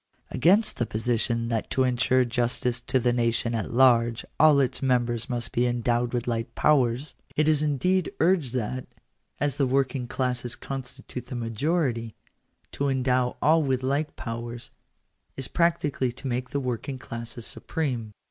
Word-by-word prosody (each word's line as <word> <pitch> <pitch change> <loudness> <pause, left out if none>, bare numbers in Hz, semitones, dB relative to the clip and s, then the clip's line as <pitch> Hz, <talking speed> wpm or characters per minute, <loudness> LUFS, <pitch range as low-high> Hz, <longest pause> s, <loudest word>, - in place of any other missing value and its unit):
Against 200 +6 +3
the 120 - -1
position 115 +1 0
that 115 -2 -2
to 130 - +2
ensure 130 0 +3
justice 120 +1 0
to 130 - 0
the 120 0 +2
nation 115 -1 +1
at 110 -3 -2
large 120 -2 +4
all 155 -2 +7
its 130 -2 0
members 120 -2 0
must 120 -2 -2
be 120 +1 +2
endowed 120 0 0
with 120 -2 -2
like 115 0 -2
powers, 130 -1 +2 0.2
it 155 0 +2
is 155 -2 +3
indeed 155 +5 +1
urged 165 -7 +2
that, 125 +2 -3 0.5
as 145 -1 0
the 140 - +2
working 130 -1 0
classes 125 -1 -2
constitute 130 -1 -6
the 125 - -6
majority, 120 0 -1 0.6
to 140 0 -1
endow 125 -1 +1
all 160 +2 +5
with 130 -3 0
like 140 +4 -1
powers, 120 0 -6 0.7
is 135 - -4
practically 160 -7 +1
to 130 +3 -12
make 125 0 -2
the 140 - -1
work 125 -1 -3
ing 135 - -4
classes 115 -1 -7
supreme. 125 -9 -3
125 Hz, 155 wpm, -26 LUFS, 120-140 Hz, 0.7 s, all